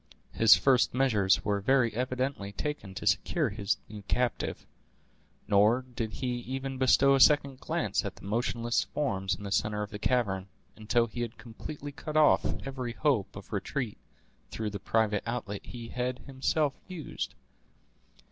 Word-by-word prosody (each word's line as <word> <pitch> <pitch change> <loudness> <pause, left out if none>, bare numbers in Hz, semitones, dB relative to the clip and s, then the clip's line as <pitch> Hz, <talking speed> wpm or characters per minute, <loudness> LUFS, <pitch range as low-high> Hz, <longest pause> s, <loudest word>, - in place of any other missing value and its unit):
His 115 -1 +7
first 130 -3 +3
measures 110 -8 +3
were 100 -1 +1
very 125 +1 +3
evidently 125 -3 -2
taken 100 -4 -5
to 105 - -6
secure 115 - +2
his 100 0 -1
new 105 -1 -9
captive; 120 +4 -1 0.8
nor 105 +5 +4
did 120 -3 -5
he 125 -1 -2
even 135 +2 -5
bestow 140 +1 +5
a 135 - +4
second 140 -1 +5
glance - - -1
at - - -5
the - - -13
motionless 120 +2 0
forms 95 -10 -1
in 100 - -11
the 100 - -5
center 105 +1 0
of 105 - -7
the 105 - -6
cavern, 100 -6 0 0.3
until 115 +2 +1
he 120 +1 -6
had 115 -1 -4
completely 145 +5 -8
cut 155 +2 -4
off 155 -1 +5 0.2
every 130 -3 -4
hope 130 -8 0
of 100 +2 -10
retreat 110 +3 -3 0.5
through 110 -1 -3
the 100 - -5
private 105 0 +1
outlet 110 -4 -4
he 115 -2 -8
had 125 0 -2
himself 140 +2 0
used. 180 -5 -5
120 Hz, 155 wpm, -29 LUFS, 105-135 Hz, 0.8 s, His